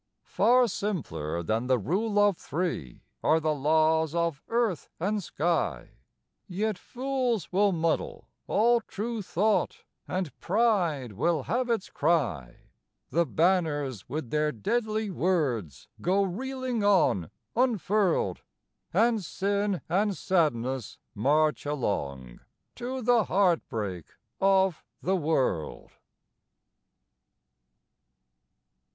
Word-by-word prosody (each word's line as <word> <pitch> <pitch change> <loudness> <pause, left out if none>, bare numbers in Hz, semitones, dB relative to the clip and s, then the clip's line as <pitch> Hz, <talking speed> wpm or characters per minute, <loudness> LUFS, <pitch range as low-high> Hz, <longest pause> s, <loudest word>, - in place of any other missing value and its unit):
Far 250 +1 +4
simpler 85 - -3
than 110 +7 -1
the 130 -1 +3
Rule 200 - -1
of 205 -2 +5
Three 165 - -4 0.2
Are 160 - +4
the 155 -1 0
laws 160 +2 +2
of 170 -4 0
earth 230 -7 0
and 205 +4 0
sky; 155 - -1 0.6
Yet 210 +4 -1
fools 250 - -2
will 200 +2 +3
muddle 165 -2 -1 0.2
all 235 +3 +3
true 225 +1 -4
thought, 205 +3 0 0.2
And 180 -8 -3
pride 180 - +1
will 145 - 0
have 245 - -1
its 225 -5 -1
cry; 140 - 0 0.5
The 170 0 +2
banners 145 - 0
with 145 -6 -4
their 150 0 +1
deadly 215 - -1
words 125 - -1
Go 195 +3 +2
reeling 255 +4 -3
on 140 - +3 0.3
unfurled, 210 - +1 0.5
And 225 +2 +2
sin 200 +2 -1
and 200 +2 +1
sadness 130 - 0 0.2
march 150 +8 +2
along 70 - -3 0.4
To 255 +1 -4
the 235 -2 +4
heartbreak 115 - 0 0.3
of 190 -2 +3 0.2
the 190 +2 +2
world. 140 - -1
175 Hz, 100 wpm, -28 LUFS, 140-210 Hz, 0.6 s, of